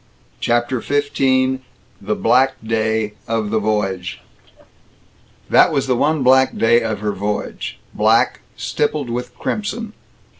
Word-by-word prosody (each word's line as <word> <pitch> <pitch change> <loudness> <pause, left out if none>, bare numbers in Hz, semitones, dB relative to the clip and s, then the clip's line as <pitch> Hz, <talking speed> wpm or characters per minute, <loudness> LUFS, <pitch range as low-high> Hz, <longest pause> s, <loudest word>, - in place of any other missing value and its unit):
CHAPTER 120 +1 0
XV 130 -2 +1 0.4
THE 105 +2 -1
BLACK 130 +3 +3
DAY 110 -1 0
OF 110 -2 -1
THE 110 - +2
VOYAGE 95 -4 -2 1.3
That - - +5
was 135 - 0
the 130 -2 +1
one 150 +3 +1
black 130 +1 +4
day 115 +1 +4
of 110 -3 -3
her 105 -1 0
voyage 105 +2 -4 0.2
black - - +3 0.2
stippled 145 -4 -1
with 125 +1 -5
crimson. 215 - -3
120 Hz, 120 wpm, -19 LUFS, 110-130 Hz, 1.3 s, That